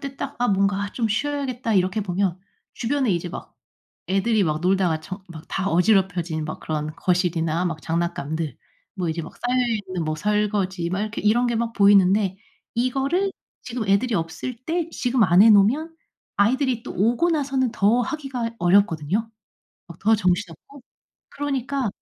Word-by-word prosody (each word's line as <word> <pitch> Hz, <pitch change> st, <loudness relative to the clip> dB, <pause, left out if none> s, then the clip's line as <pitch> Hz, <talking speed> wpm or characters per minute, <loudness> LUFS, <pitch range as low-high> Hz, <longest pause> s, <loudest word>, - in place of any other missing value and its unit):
때 275 Hz, -1 st, -7 dB
딱 -, -, -5 dB
'아 245 Hz, -, +2 dB
뭔가 200 Hz, +1 st, +1 dB
좀 230 Hz, -3 st, -1 dB
쉬어야겠다.' 255 Hz, -1 st, -1 dB
이렇게 185 Hz, +3 st, +2 dB
보면 185 Hz, -1 st, -1 dB, 0.3 s
주변에 260 Hz, 0 st, 0 dB
이제 175 Hz, 0 st, -2 dB
막 -, -, -9 dB, 0.5 s
애들이 200 Hz, +3 st, +2 dB
막 155 Hz, -2 st, -1 dB
놀다가 180 Hz, -2 st, +2 dB
정 185 Hz, +4 st, -8 dB
막 160 Hz, -2 st, -10 dB
다 195 Hz, +1 st, -1 dB
어지럽혀진 180 Hz, -4 st, +2 dB
막 155 Hz, -, -5 dB
그런 155 Hz, -1 st, -3 dB
거실이나 175 Hz, -2 st, 0 dB
막 165 Hz, -3 st, -4 dB
장난감들 160 Hz, -2 st, -2 dB, 0.4 s
뭐 180 Hz, -4 st, -2 dB
이제 165 Hz, +1 st, -2 dB
막 160 Hz, -, -9 dB
쌓여있는 225 Hz, -8 st, -1 dB
뭐 155 Hz, 0 st, -2 dB
설거지 200 Hz, -2 st, 0 dB
막 185 Hz, -, -1 dB
이렇게 215 Hz, 0 st, -4 dB
이런 235 Hz, +4 st, +3 dB
게 235 Hz, -, 0 dB
막 230 Hz, 0 st, -1 dB
보이는데 200 Hz, -1 st, +4 dB, 0.4 s
이거를 270 Hz, +11 st, 0 dB, 0.3 s
지금 235 Hz, -3 st, -4 dB
애들이 205 Hz, +4 st, +2 dB
없을 180 Hz, +8 st, -3 dB
때 335 Hz, 0 st, -1 dB
지금 250 Hz, -4 st, +1 dB
안 180 Hz, +1 st, +5 dB
해 225 Hz, -, +7 dB
놓으면 250 Hz, +11 st, +3 dB, 0.4 s
아이들이 250 Hz, +3 st, +2 dB
또 -, -, -7 dB
오고 235 Hz, -, +2 dB
나서는 270 Hz, -5 st, 0 dB
더 225 Hz, +2 st, +3 dB
하기가 260 Hz, -5 st, -4 dB
어렵거든요, 190 Hz, +3 st, +2 dB, 0.6 s
막 170 Hz, -1 st, -11 dB
더 220 Hz, +2 st, +4 dB
정신없고 185 Hz, -, -2 dB, 0.5 s
그러니까 275 Hz, -3 st, -2 dB
205 Hz, 325 characters per minute, -23 LUFS, 180-245 Hz, 0.6 s, 해